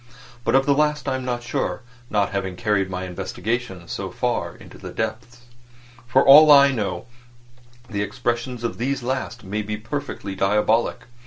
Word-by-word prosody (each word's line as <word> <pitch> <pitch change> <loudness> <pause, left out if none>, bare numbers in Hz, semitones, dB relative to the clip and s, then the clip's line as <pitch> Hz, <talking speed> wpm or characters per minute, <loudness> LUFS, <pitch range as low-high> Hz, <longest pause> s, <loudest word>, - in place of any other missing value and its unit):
But - - +1
of 135 0 +4
that 140 - +4
last 150 0 +1
I 135 - +1
am 130 0 -3
not 120 -1 -3
sure, 120 - -2 0.3
not 105 -2 +1
having 95 -2 -3
carried 105 -2 0
my 95 0 -4
investigations 95 +1 -4
so - - -4
far - - -2
into - - -14
the - - -8
depths. 115 +2 -5 0.7
For 130 +2 +3
all 150 +2 +9
I 140 -1 +8
know, 110 -5 -3 0.8
the 100 -3 -3
expression 120 +3 -2
of 115 - -4
these 130 +1 -1
last 125 -2 -3
may 105 +2 -3
be 105 0 -4
perfectly 110 -3 -5
diabolic. 105 +4 +1
120 Hz, 165 wpm, -23 LUFS, 100-130 Hz, 0.8 s, all